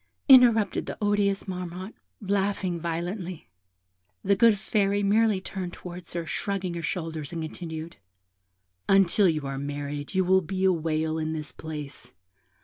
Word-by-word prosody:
interrupted 235 -7 +6
the - - -5
odious 205 -1 +1
Marmotte, 180 +2 -5 0.3
laughing 195 -3 -1
violently. 170 - -4 0.8
The 200 - +3
good 230 0 +5
Fairy 200 0 +1
merely 210 0 +3
turned 185 -1 -6
towards 175 -1 -9
her, 170 -1 -3
shrugging 190 +3 -3
her 170 - -4
shoulders, 160 -2 -4
and 165 -2 -4
continued 160 0 -7 0.9
'Until 195 0 +5
you 155 -3 -1
are 135 0 -4
married 145 +2 -5
you 190 -1 +3
will 190 +1 +4
be 185 +3 -2
a 190 - +5
whale 160 -1 -1
in 155 0 -2
this 155 -2 -5
place. 150 -3 -8
180 Hz, 145 wpm, -27 LUFS, 160-200 Hz, 0.9 s, interrupted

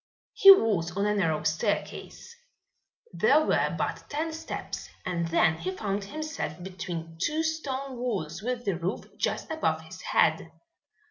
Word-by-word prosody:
He 390 - +7
was 200 - +6
on 200 - +1
a 210 - +2
narrow 160 -6 +1
staircase. 205 - -2 0.8
There 310 +1 +4
were - - +1
but - - -2
ten 315 +2 -2
steps 320 - -6 0.2
and 170 -2 -1
then 165 -1 +3
he 175 +3 -3
found 200 -1 -2
himself 310 +6 -4
between 170 -3 -6
two 310 +2 +1
stone 275 -5 -3
walls 190 -9 -3
with 245 +1 -3
the 195 -4 0
roof 180 +4 -2 0.2
just - - -1
above 320 0 0
his - - -11
head. - - +2
205 Hz, 145 wpm, -28 LUFS, -, 0.8 s, He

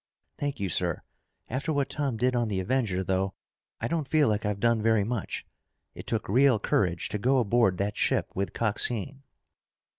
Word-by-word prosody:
"Thank 145 -1 -2
you, 100 - -1
sir. 85 - -1 0.4
After 140 +7 -2
what 140 -2 0
Tom 140 -5 -1
did 125 +2 +1
on 120 -1 +1
the 100 -3 -1
Avenger, 100 -3 0
though, 95 +1 -1 0.4
I - - -1
don't 160 -3 -1
feel 150 0 +3
like 105 0 0
I've 105 -1 -2
done 115 -1 +2
very 110 -1 +3
much. 115 -1 -3 0.5
It - - -10
took 115 -2 -1
real 130 +3 +5
courage 90 -4 0
to 105 - -3
go 130 +5 +3
aboard 115 -5 +3
that 100 +2 -1
ship - - 0
with 95 +1 -2
Coxine." 115 +4 -1
115 Hz, 180 wpm, -28 LUFS, 100-130 Hz, 0.5 s, real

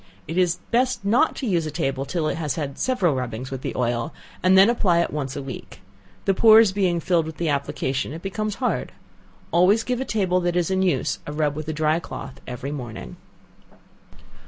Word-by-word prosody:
It 165 - -4
is 180 -2 +2
best 250 -2 +1
not 235 +10 +3
to 270 - -4
use 170 -7 +1
a - - -2
table 135 -3 -2
till 160 +1 -1
it - - 0
has 155 -2 -2
had 145 -4 -4
several 200 - +1
rubbings 125 0 -4
with 135 -1 -5
the - - -4
oil, 120 +4 -1 0.3
and 185 +1 +5
then 195 +2 +8
apply 190 -8 +3
it - - -2
once 135 -3 -3
a 140 - -4
week. 135 -2 -8 0.5
The 195 - +3
pores 220 0 +7
being 185 -3 +1
filled 165 -1 +1
with 160 -1 -8
the 165 -1 -1
application 140 -2 -1
it 165 +3 -8
becomes 210 +2 -3
hard. 250 - -2 0.6
Always 190 +6 +4
give 250 +1 -2
a - - +1
table 190 -6 +1
that 175 -1 -1
is 175 0 +1
in 190 0 +1
use 185 -2 0
a - - -4
rub 150 -1 0
with 155 0 -6
a - - -1
dry 155 +1 +1
cloth 140 -5 -8
every 125 +3 -5
morning. 115 - -7
170 Hz, 205 wpm, -23 LUFS, 140-195 Hz, 0.6 s, then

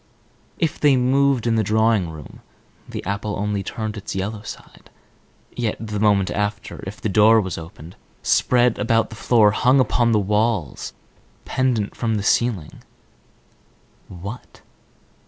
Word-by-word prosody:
If 165 -2 -1
they 145 -3 +4
moved 130 0 +2
in 115 -1 +2
the 110 - +2
drawing 110 -3 +2
room, 80 -3 -11 0.5
the - - -6
apple 100 +2 -3
only 105 0 -1
turned 110 +2 -5
its 100 - -6
yellow 100 +2 -3
side. 105 - -11 0.7
Yet, 115 -3 -2
the 110 -2 -4
moment 100 -2 +2
after, 105 0 -3
if 100 - -7
the - - -2
door 110 +2 +5
was 95 -5 -3
opened, 85 +1 -10 0.3
spread 125 -2 +2
about 115 +1 +1
the - - -8
floor, 110 -2 +4
hung 130 +6 +3
upon 120 -2 +2
the 110 - +3
walls, 105 -4 -1 0.5
pendant 125 -6 0
from 115 -2 -1
the 105 - -2
ceiling—what? 100 0 -6
110 Hz, 140 wpm, -21 LUFS, 100-120 Hz, 0.7 s, door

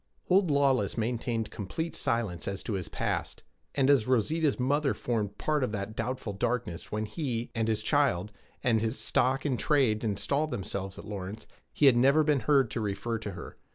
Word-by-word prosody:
Old 185 -1 +5
Lawless 135 -8 +2
maintained 115 -1 -1
complete 160 - -4
silence 105 -8 -1
as 100 -1 -3
to 110 - -3
his 95 -3 -3
past; - - -3 0.3
and 135 -2 +3
as 140 -6 +4
Rosita's 140 +5 +2
mother 140 +2 +1
formed 110 -5 -2
part 150 -3 0
of 125 - -1
that 105 +1 -4
doubtful 120 -2 -3
darkness 100 -4 -2
when 110 +1 -1
he, 120 -2 -3
and 115 -1 0
his 110 -1 0
child, 110 - +1 0.3
and 115 -4 +3
his 115 +3 -1
stock 130 +3 +1
in 135 -4 +1
trade 120 -3 +2
installed 140 +8 0
themselves 95 -4 -4
at - - -9
Lawrence, 100 +1 -6 0.3
he 150 - +2
had 130 -3 +7
never 140 +5 +5
been 150 -2 +2
heard 135 -5 +3
to 115 - -2
refer 105 +3 -2
to 105 -2 -5
her. - - -9
115 Hz, 185 wpm, -29 LUFS, 105-140 Hz, 0.3 s, had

